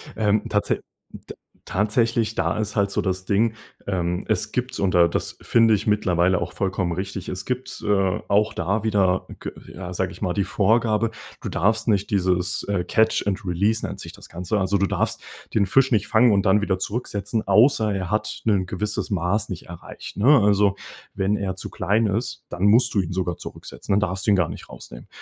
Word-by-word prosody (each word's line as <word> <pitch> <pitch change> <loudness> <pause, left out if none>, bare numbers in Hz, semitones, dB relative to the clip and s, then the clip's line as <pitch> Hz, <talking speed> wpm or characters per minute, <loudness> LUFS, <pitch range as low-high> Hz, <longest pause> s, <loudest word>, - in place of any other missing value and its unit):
Ähm, 105 -1 +2
tatsä - - 0 0.3
d - - -10 0.3
tatsächlich, 110 +2 +1
da - - -1
ist 105 -1 -3
halt 100 -1 +2
so - - -2
das 95 -1 -2
Ding, 110 +4 +2 0.3
ähm, 90 -1 -2
es 110 0 -1
gibt 125 0 -3
und 95 -2 +1
da 85 -1 +6
das 85 - -3
finde 115 -2 +4
ich 105 - -4
mittlerweile 90 -4 +2
auch 85 +1 -4
vollkommen 95 -2 -1
richtig 95 +1 -5
Es 90 +2 -5
gibt, 130 +1 -4
äh, 95 -3 +2
auch 105 +2 +2
da 100 +6 -1
wieder 95 -4 +1
g - - -5 0.2
ja, 90 0 -6
sage 95 0 -1
ich - - -13
mal 90 -4 0
die 100 0 0
Vorgabe, 110 +3 +2 0.3
du - - -4
darfst 110 +5 +1
nicht 100 -2 +1
dieses 90 -1 0
äh, 100 -3 0
catch 110 0 +2
and 100 0 -2
release 100 +6 +1
nennt - - -6
sich - - -8
das - - -14
Ganze 90 +5 -2
Also, 95 +1 +1
du 100 - +2
darfst - - -1 0.3
den 105 -2 +3
Fisch 135 +3 +3
nicht 105 -4 +2
fangen 115 +1 +5
und 100 -1 +2
dann 105 +2 +4
wieder 95 -3 0
zurücksetzen, 105 0 -3
außer 110 +1 +4
er 95 -3 -3
hat 105 0 -2
'nen 100 -4 +2
gewisses 105 +4 -3
Maß 95 +3 0
nicht 90 - -7
erreicht, 85 0 -10
ne? 135 +7 +6
Also, 100 -1 +3 0.4
wenn 100 +2 0
er 95 -2 -3
zu 95 - -6
klein 105 +4 +1
ist, 115 +3 -3
dann 90 +2 -5
musst 120 +4 +5
du 100 - +4
ihn 90 -1 -5
sogar 90 -2 -2
zurücksetzen. - - -6
Dann 100 - +4
darfst 95 -2 -2
du 105 - +3
ihn 100 - +5
gar 85 -3 +1
nicht - - -9
rausnehmen. - - -11
100 Hz, 205 wpm, -23 LUFS, 95-110 Hz, 0.4 s, da